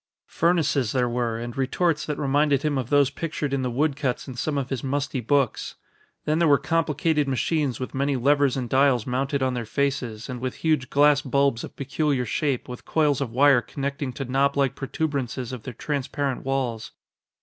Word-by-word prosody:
Furnaces 155 Hz, -8 st, +1 dB
there 125 Hz, -2 st, +2 dB
were, 120 Hz, -1 st, -1 dB
and 120 Hz, +1 st, -6 dB
retorts 150 Hz, +4 st, 0 dB
that 150 Hz, -2 st, -2 dB
reminded 145 Hz, 0 st, +2 dB
him 150 Hz, -2 st, 0 dB
of 130 Hz, -3 st, -2 dB
those 145 Hz, -2 st, +4 dB
pictured 150 Hz, -2 st, -3 dB
in 135 Hz, -, 0 dB
the 130 Hz, -, -1 dB
wood 140 Hz, +4 st, 0 dB
cuts 135 Hz, -3 st, -2 dB
in 130 Hz, -, -6 dB
some 145 Hz, +4 st, -2 dB
of 135 Hz, -1 st, -3 dB
his 135 Hz, -, -2 dB
musty 140 Hz, 0 st, -1 dB
books. 135 Hz, +1 st, 0 dB, 0.5 s
Then 155 Hz, +1 st, +1 dB
there 170 Hz, -, +4 dB
were 145 Hz, -2 st, +6 dB
complicated 160 Hz, -1 st, 0 dB
machines 135 Hz, 0 st, 0 dB
with 130 Hz, -, -5 dB
many 140 Hz, +1 st, 0 dB
levers 140 Hz, +1 st, +2 dB
and 125 Hz, -2 st, -2 dB
dials 130 Hz, -3 st, +3 dB
mounted 135 Hz, +2 st, -1 dB
on 130 Hz, -1 st, +1 dB
their 120 Hz, -1 st, -2 dB
faces, 125 Hz, -4 st, -2 dB
and 125 Hz, -2 st, -5 dB
with 130 Hz, -1 st, -3 dB
huge 150 Hz, -6 st, +2 dB
glass 145 Hz, 0 st, +4 dB
bulbs 140 Hz, -3 st, +1 dB
of -, -, -9 dB
peculiar 140 Hz, -1 st, -1 dB
shape 135 Hz, +2 st, -1 dB
with 125 Hz, -1 st, -8 dB
coils 150 Hz, -4 st, +1 dB
of 135 Hz, -, -1 dB
wire 135 Hz, +1 st, +5 dB
connecting 140 Hz, +2 st, -4 dB
to 135 Hz, -, -5 dB
knoblike 140 Hz, +1 st, +1 dB
protuberances 135 Hz, -3 st, -3 dB
of 125 Hz, -, -6 dB
their 130 Hz, -, -7 dB
transparent 140 Hz, -1 st, -2 dB
walls. 130 Hz, -4 st, -2 dB
140 Hz, 190 wpm, -25 LUFS, 125-145 Hz, 0.5 s, were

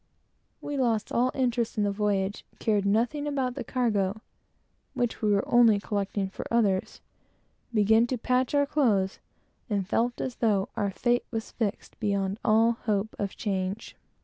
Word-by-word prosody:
We 290 Hz, -1 st, -4 dB
lost 230 Hz, -5 st, 0 dB
all 245 Hz, +2 st, +2 dB
interest 240 Hz, -3 st, 0 dB
in 210 Hz, -, +2 dB
the 205 Hz, -, +1 dB
voyage; 200 Hz, -1 st, -1 dB
cared 205 Hz, -3 st, +1 dB
nothing 245 Hz, +8 st, +1 dB
about 265 Hz, -3 st, -1 dB
the -, -, -5 dB
cargo, 215 Hz, -5 st, 0 dB, 0.7 s
which 245 Hz, -2 st, -1 dB
we 215 Hz, -, +2 dB
were 200 Hz, -1 st, +1 dB
only 230 Hz, -4 st, +5 dB
collecting 200 Hz, -1 st, -2 dB
for 190 Hz, -, -7 dB
others; 205 Hz, -5 st, +1 dB, 0.7 s
began 220 Hz, +1 st, +4 dB
to 255 Hz, -, -2 dB
patch 255 Hz, +3 st, 0 dB
our 285 Hz, 0 st, +4 dB
clothes; 220 Hz, -10 st, +1 dB, 0.5 s
and 200 Hz, -3 st, -1 dB
felt 240 Hz, +4 st, 0 dB
as 255 Hz, -2 st, -4 dB
though 205 Hz, -4 st, +1 dB
we 240 Hz, +5 st, +1 dB
were 225 Hz, -, -1 dB
fixed 220 Hz, -1 st, -5 dB
beyond 200 Hz, -2 st, -1 dB
all 225 Hz, +1 st, +4 dB
hope 210 Hz, -1 st, 0 dB
of 200 Hz, -2 st, -3 dB
change. 195 Hz, 0 st, -3 dB
220 Hz, 150 wpm, -27 LUFS, 200-240 Hz, 0.7 s, only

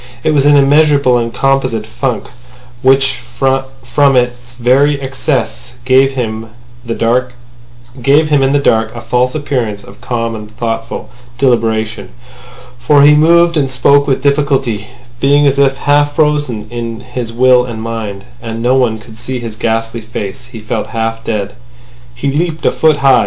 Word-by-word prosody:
It -, -, +2 dB
was 145 Hz, -1 st, +3 dB
an 145 Hz, -, +6 dB
immeasurable 140 Hz, -2 st, +4 dB
and 115 Hz, 0 st, -3 dB
composite 130 Hz, -5 st, 0 dB
funk, 125 Hz, +2 st, -3 dB, 0.6 s
which 135 Hz, -1 st, +2 dB, 0.2 s
from 135 Hz, 0 st, 0 dB
its 120 Hz, -1 st, -1 dB
very 135 Hz, +4 st, +2 dB
excess 130 Hz, -4 st, -3 dB
gave 135 Hz, +1 st, +4 dB
him 115 Hz, -3 st, -3 dB, 0.4 s
in -, -, -15 dB
the 115 Hz, -, -2 dB
dark 125 Hz, +2 st, 0 dB, 1.6 s
a -, -, -5 dB
false 125 Hz, +3 st, 0 dB
appearance 125 Hz, -8 st, -2 dB
of 125 Hz, -, -15 dB
calm 115 Hz, -2 st, -3 dB
and 110 Hz, 0 st, -10 dB
thoughtful 115 Hz, 0 st, -4 dB, 0.3 s
deliberation. 110 Hz, -5 st, 0 dB, 0.7 s
For 140 Hz, +3 st, +4 dB
he 150 Hz, +1 st, +7 dB
moved 170 Hz, +2 st, +4 dB
and 140 Hz, -3 st, +1 dB
spoke 140 Hz, +3 st, +3 dB
with 135 Hz, -1 st, 0 dB
difficulty, 135 Hz, -7 st, 0 dB, 0.3 s
being 145 Hz, +2 st, +3 dB
as 140 Hz, 0 st, +2 dB
if 135 Hz, -1 st, +3 dB
half 145 Hz, 0 st, +1 dB
frozen 145 Hz, -8 st, 0 dB
in 115 Hz, -1 st, -5 dB
his 125 Hz, -2 st, -6 dB
will 125 Hz, +1 st, +4 dB
and 115 Hz, -3 st, -6 dB
mind—and 115 Hz, +1 st, -6 dB
no 120 Hz, +2 st, +1 dB
one 120 Hz, -4 st, +1 dB
could 110 Hz, 0 st, -14 dB
see 130 Hz, +1 st, -4 dB
his 115 Hz, -3 st, -7 dB
ghastly 115 Hz, +1 st, -2 dB
face. 110 Hz, -1 st, -6 dB
He 125 Hz, -3 st, -10 dB
felt 110 Hz, -, -3 dB
half 115 Hz, 0 st, -3 dB
dead. 100 Hz, -3 st, -3 dB, 0.6 s
He 135 Hz, +3 st, -2 dB
leaped 160 Hz, +2 st, -2 dB
a -, -, +4 dB
foot 155 Hz, -2 st, +2 dB
high. 140 Hz, -1 st, +3 dB
125 Hz, 150 wpm, -13 LUFS, 115-140 Hz, 1.6 s, he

